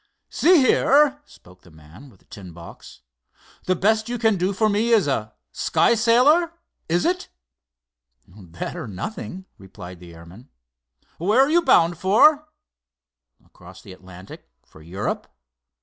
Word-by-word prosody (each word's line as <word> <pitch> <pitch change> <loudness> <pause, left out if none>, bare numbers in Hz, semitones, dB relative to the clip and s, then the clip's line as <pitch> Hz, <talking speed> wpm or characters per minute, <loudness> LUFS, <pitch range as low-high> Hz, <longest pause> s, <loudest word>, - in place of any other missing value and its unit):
"See 355 +2 +3
here," 285 +1 +3
spoke 90 - -20
the 90 - -20
man 80 - -17
with 100 -7 -24
the - - -31
tin 95 -4 -12
box, 85 -6 -14 0.6
"the 185 - 0
best 220 +4 0
you 245 - -3
can 225 -2 +1
do 185 +1 -1
for 215 +2 0
me 215 +3 0
is 220 -9 +3
a 110 -6 -3 0.2
sky - - +1
sailor, 255 +10 +2 0.4
is 175 +2 0
it?" 360 +1 -2 1.0
"That, 90 -3 -9
or - - -7
nothing," 185 - -8
replied 90 -2 -12
the 85 -1 -14
airman. 85 +8 -16 0.7
"Where 210 +9 +2
are 275 +2 +2
you 345 +1 +3
bound 170 - +2
for?" 295 +11 +3 1.0
"Across - - -17
the 95 - -12
Atlantic, 95 -2 -14 0.2
for 80 - -19
Europe." 90 +6 -5
180 Hz, 145 wpm, -21 LUFS, -, 1.0 s, See